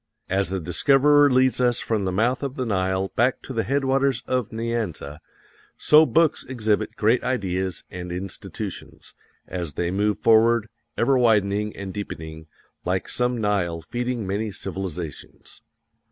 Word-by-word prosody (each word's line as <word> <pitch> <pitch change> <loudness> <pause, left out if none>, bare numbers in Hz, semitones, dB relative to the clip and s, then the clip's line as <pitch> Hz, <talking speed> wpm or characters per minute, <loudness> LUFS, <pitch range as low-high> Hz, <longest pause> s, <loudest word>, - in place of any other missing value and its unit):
As 95 -1 +1
the 95 0 -2
discoverer 140 - +4
leads 130 0 +3
us 120 -1 +2
from 110 -4 -1
the 95 - 0
mouth 115 +7 +1
of 140 -2 -4
the 130 - -2
Nile 95 -2 0
back 125 +2 +1
to 130 - -7
the 115 - 0
headwaters 135 +1 +1
of 125 -4 -1
Nyanza, 110 -11 -3 0.6
so 155 +1 +6
books 160 -1 +2
exhibit 110 -5 -1
great 115 +4 +2
ideas 95 -7 -2
and 90 -1 -6
institutions, 90 +2 -6 0.3
as 85 -5 -4
they 85 +4 -2
move 105 +2 +1
forward, 115 0 +4 0.3
ever 130 +2 +3
widening 105 -3 +2
and 95 -1 -6
deepening, 80 -5 -7 0.4
like 90 +1 -1
some 125 -1 0
Nile 90 -6 -1
feeding 120 -2 -3
many 105 +3 -2
civilizations. 90 -5 -6
105 Hz, 140 wpm, -24 LUFS, 95-125 Hz, 0.6 s, so